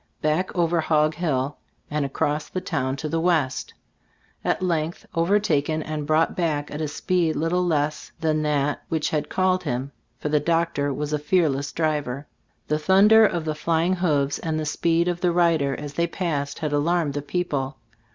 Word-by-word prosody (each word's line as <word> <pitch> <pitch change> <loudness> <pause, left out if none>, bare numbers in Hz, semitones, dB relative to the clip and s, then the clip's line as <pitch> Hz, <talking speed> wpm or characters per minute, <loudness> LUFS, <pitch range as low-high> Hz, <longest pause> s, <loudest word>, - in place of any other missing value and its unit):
Back 155 +5 +1
over 170 -1 +2
"Hog 155 -1 +2
Hill" 145 -4 -1 0.3
and 150 0 0
across 150 +2 -1
the 185 - -3
town 135 -7 -2
to 145 +3 -4
the 165 +2 -1
west. 160 -6 0 0.7
At - - 0
length 165 -2 -1
overtaken 165 -4 +1
and 150 -1 -4
brought 155 +1 +2
back 150 -4 -1
at 150 - -4
a 155 - -1
speed 165 +2 0
little 170 +3 +1
less 155 -3 -1
than 155 -1 +1
that 145 -1 0
which 155 -2 -1
had 150 -1 -1
called 185 0 +2
him, 130 +3 -3 0.3
for 150 - -3
the 150 0 +3
doctor 165 -2 0
was 150 +2 -3
a 150 - +1
fearless 145 -3 +1
driver. 150 -4 -1 0.4
The 150 0 0
thunder 200 +7 +6
of 170 -4 -3
the 155 - -1
flying 165 +3 +1
hoofs 150 -6 +1
and 160 -1 -2
the 155 - -2
speed 165 +3 +1
of 175 0 -1
the 180 -2 +3
rid 170 -2 +3
er 140 -1 0
as 145 -1 -7
they 170 +2 +1
passed 150 -6 -2
had 150 -2 -2
alarmed 155 0 +1
the 145 - -2
peo 180 +5 -1
ple. 135 -5 -3
155 Hz, 185 wpm, -24 LUFS, 145-170 Hz, 0.7 s, thunder